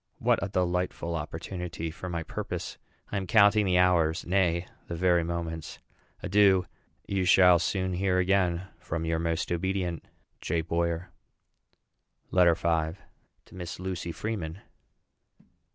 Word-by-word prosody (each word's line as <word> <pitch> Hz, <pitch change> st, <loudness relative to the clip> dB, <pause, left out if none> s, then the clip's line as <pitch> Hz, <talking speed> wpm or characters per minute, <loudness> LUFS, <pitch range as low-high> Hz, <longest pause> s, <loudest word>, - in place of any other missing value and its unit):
What -, -, +2 dB
a 100 Hz, -, -2 dB
delightful 90 Hz, -2 st, -1 dB
opportunity 85 Hz, +1 st, -5 dB
for 90 Hz, +2 st, -7 dB
my 85 Hz, -1 st, -3 dB
purpose! -, -, -5 dB, 0.3 s
I 100 Hz, -, -1 dB
am 95 Hz, -1 st, -3 dB
counting 105 Hz, 0 st, +5 dB
the 90 Hz, -1 st, +3 dB
hours 90 Hz, -2 st, +3 dB
nay, 90 Hz, -1 st, +1 dB, 0.2 s
the 85 Hz, -, -4 dB
very 90 Hz, 0 st, +3 dB
moments. 80 Hz, -1 st, -4 dB, 0.5 s
Adieu. 95 Hz, -2 st, +4 dB, 0.4 s
You 95 Hz, -1 st, -1 dB
shall 90 Hz, -1 st, +6 dB
soon 95 Hz, +2 st, -1 dB
again 90 Hz, -1 st, +2 dB
hear 95 Hz, +2 st, -9 dB
from 85 Hz, -1 st, -4 dB
your 80 Hz, 0 st, 0 dB
most 85 Hz, 0 st, -1 dB
obedient, 90 Hz, -1 st, -1 dB, 0.4 s
J. 80 Hz, +1 st, 0 dB
BOYER. 85 Hz, +2 st, -2 dB, 1.2 s
LETTER 90 Hz, -2 st, +5 dB
V. 80 Hz, +1 st, 0 dB, 0.5 s
TO -, -, -19 dB
MISS 90 Hz, -1 st, -7 dB
LUCY 90 Hz, -2 st, -4 dB
FREEMAN. 95 Hz, -3 st, -4 dB
90 Hz, 130 wpm, -28 LUFS, 85-95 Hz, 1.2 s, shall